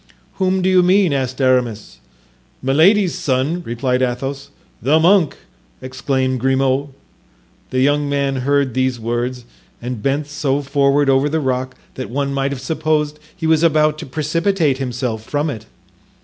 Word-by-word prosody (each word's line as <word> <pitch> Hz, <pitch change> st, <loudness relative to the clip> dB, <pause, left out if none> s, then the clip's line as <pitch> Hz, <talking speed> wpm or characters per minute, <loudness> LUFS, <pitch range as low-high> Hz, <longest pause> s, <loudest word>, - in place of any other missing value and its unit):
"Whom 190 Hz, -1 st, +1 dB
do -, -, +2 dB
you 185 Hz, -1 st, +5 dB
mean?" 180 Hz, -2 st, +3 dB
asked 130 Hz, -1 st, -2 dB
Aramis. 125 Hz, -, 0 dB, 0.6 s
"Milady's 170 Hz, +8 st, +4 dB
son," 140 Hz, +6 st, -1 dB
replied 125 Hz, +1 st, -1 dB
Athos. 135 Hz, +2 st, -3 dB, 0.3 s
"The 145 Hz, +6 st, +3 dB
monk!" 175 Hz, -1 st, +3 dB, 0.4 s
exclaimed 130 Hz, 0 st, -2 dB
Grimaud. 135 Hz, +2 st, +1 dB, 0.8 s
The 130 Hz, -, 0 dB
young 145 Hz, +1 st, +2 dB
man 140 Hz, -1 st, 0 dB
heard 140 Hz, 0 st, +1 dB
these 130 Hz, -1 st, 0 dB
words 120 Hz, +2 st, -3 dB, 0.3 s
and 120 Hz, -2 st, -5 dB
bent 140 Hz, +5 st, 0 dB
so 145 Hz, -1 st, -1 dB
forward 140 Hz, +1 st, +2 dB
over 135 Hz, +2 st, +3 dB
the 160 Hz, +2 st, 0 dB
rock 130 Hz, -2 st, -2 dB, 0.2 s
that 130 Hz, -, -6 dB
one 140 Hz, +2 st, -2 dB
might 135 Hz, 0 st, -1 dB
have 135 Hz, -2 st, -5 dB
supposed 150 Hz, 0 st, -1 dB, 0.2 s
he 160 Hz, -, -5 dB
was 160 Hz, -1 st, +3 dB
about 155 Hz, -2 st, +3 dB
to -, -, -7 dB
precipitate 155 Hz, +1 st, 0 dB
himself 125 Hz, -4 st, -3 dB
from 145 Hz, +5 st, -2 dB
it. 110 Hz, -4 st, -9 dB
140 Hz, 150 wpm, -18 LUFS, 130-155 Hz, 0.8 s, you